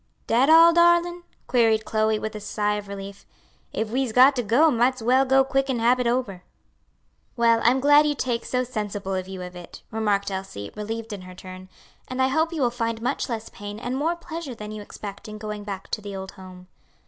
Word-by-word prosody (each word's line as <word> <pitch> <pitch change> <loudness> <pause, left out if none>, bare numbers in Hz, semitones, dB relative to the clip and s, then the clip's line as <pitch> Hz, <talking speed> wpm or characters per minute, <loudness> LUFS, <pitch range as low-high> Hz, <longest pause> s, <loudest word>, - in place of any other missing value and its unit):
"Dat 245 +5 +3
all, 330 +1 +8
darlin'?" 345 +1 +3 0.2
queried 225 -3 +2
Chloe, 215 0 +1
with 220 +1 -5
a 215 - -6
sigh 210 0 -1
of 210 -1 -5
relief, 200 0 -8 0.5
"if 220 0 -3
we's 260 -1 0
got 260 +4 +6
to 250 - 0
go, 250 +9 +4
might's 245 +1 +1
well 260 +3 +4
go 270 0 +4
quick 270 0 0
an' 260 - 0
hab 240 +2 +3
it 250 - 0
ober." 235 -7 -1 1.0
"Well, 230 -1 +4
I'm 250 +3 +4
glad 290 +2 +5
you 295 - 0
take 240 -3 -2
so 250 0 -1
sensible 210 -5 -4
a 185 - 0
view 185 0 -8
of 180 0 -9
it," 175 -1 -11
remarked 205 -2 0
Elsie, 190 - -6
relieved 225 +1 -5
in 200 - -7
her 185 0 -11
turn; 185 0 -11 0.4
"and 255 0 -6
I 260 0 +3
hope 320 +4 +1
you 315 -5 -1
will 240 - +2
find 230 -2 -2
much 240 +3 -2
less 225 -2 -4
pain 205 0 -8
and 245 +2 -3
more 320 +5 0
pleasure 330 -6 -7
than 210 -1 -8
you 215 0 -7
expect 205 +1 -9
in 215 0 -8
going 210 -1 -6
back 195 -2 -6
to 215 - -3
the 200 -1 -7
old 190 0 -6
home." 185 -2 -13
225 Hz, 220 wpm, -24 LUFS, 205-260 Hz, 1.0 s, all